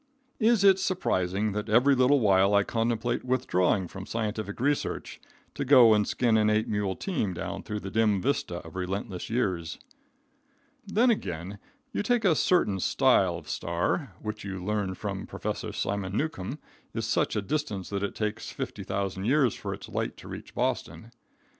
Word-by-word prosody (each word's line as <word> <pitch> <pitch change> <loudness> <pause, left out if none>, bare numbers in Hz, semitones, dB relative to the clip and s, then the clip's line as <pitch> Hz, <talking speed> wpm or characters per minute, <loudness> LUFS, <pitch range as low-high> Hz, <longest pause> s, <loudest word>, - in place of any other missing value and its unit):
Is 225 -3 +4
it 195 -1 +6
surprising 105 - 0
that 105 +2 -4
every 125 +6 +5
little 130 +2 +4
while 100 -2 +4
I 100 - +5
contemplate 115 +2 -1
withdrawing 100 -8 +1
from 95 +2 -9
scientific 110 -2 -3
research, 145 +3 -1 0.3
to - - -3
go 125 -5 +7
and 105 -1 +2
skin 120 -3 +2
an 105 -1 +3
eight 110 0 +2
mule 105 -3 -1
team 110 - -2
down - - -4
through 105 -1 -5
the 95 - -6
dim 105 -2 +2
vista 120 -6 -1
of 80 - -11
relentless 95 +1 -4
years? 95 -8 -1 1.1
Then, 235 +5 +4
again, 95 - -4 0.3
you - - -1
take 230 +1 +1
a 180 - +6
certain 140 - +2
style 95 -6 +3
of 80 -3 -12
star, 90 - -2
which 105 0 -5
you 95 -2 -5
learn 100 -3 -1
from - - -5
Professor - - -4
Simon 100 0 -2
Newcomb 140 -4 -3 0.4
is 115 -1 -1
such 115 - +1
a 105 - +1
distance 105 -7 -3
that 100 -1 -2
it 100 - -3
takes 105 -1 -3
50,000 95 0 -4
years 130 -1 +3
for - - -5
its - - -7
light - - -3
to - - -12
reach - - -9
Boston. 115 +1 -2
105 Hz, 165 wpm, -28 LUFS, 95-130 Hz, 1.1 s, go